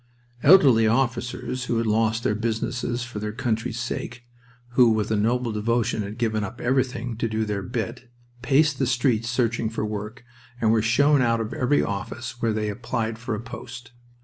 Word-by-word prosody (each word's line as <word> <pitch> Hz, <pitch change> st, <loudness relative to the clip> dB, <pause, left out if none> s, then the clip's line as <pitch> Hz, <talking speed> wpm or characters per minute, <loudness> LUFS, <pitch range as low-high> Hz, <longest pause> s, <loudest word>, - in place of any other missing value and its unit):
Elderly 135 Hz, -9 st, +6 dB
officers 125 Hz, +1 st, -1 dB
who 120 Hz, -, -1 dB
had 115 Hz, -, 0 dB
lost 110 Hz, +1 st, +1 dB
their 125 Hz, -, +1 dB
businesses 120 Hz, +2 st, -2 dB
for 120 Hz, -3 st, -6 dB
their 105 Hz, 0 st, -3 dB
country's 115 Hz, 0 st, -2 dB
sake, 120 Hz, +1 st, -5 dB, 0.5 s
who 120 Hz, 0 st, +5 dB
with 110 Hz, -1 st, 0 dB
a -, -, +3 dB
noble 120 Hz, +3 st, +1 dB
devotion 110 Hz, +1 st, 0 dB
had 105 Hz, +2 st, -6 dB
given 110 Hz, -3 st, 0 dB
up 100 Hz, +4 st, -6 dB
everything 125 Hz, -2 st, -1 dB
to 115 Hz, 0 st, -1 dB
"do 110 Hz, 0 st, -1 dB
their 105 Hz, -2 st, -2 dB
bit," 120 Hz, +2 st, -5 dB, 0.3 s
paced 145 Hz, +2 st, +3 dB
the 135 Hz, -, +1 dB
streets 120 Hz, -2 st, +1 dB
searching 115 Hz, -2 st, 0 dB
for 115 Hz, -1 st, -3 dB
work, 105 Hz, +4 st, -6 dB, 0.4 s
and 110 Hz, -2 st, +3 dB
were 110 Hz, -1 st, +3 dB
shown 140 Hz, +6 st, +4 dB
out 115 Hz, -2 st, +2 dB
of 115 Hz, 0 st, -3 dB
every 130 Hz, +3 st, +2 dB
office 120 Hz, +5 st, -5 dB
where 115 Hz, -, +2 dB
they 105 Hz, 0 st, -1 dB
applied 115 Hz, +1 st, -3 dB
for 115 Hz, -2 st, -3 dB
a -, -, -5 dB
post. 120 Hz, +1 st, -9 dB
115 Hz, 180 wpm, -24 LUFS, 110-125 Hz, 0.5 s, Elderly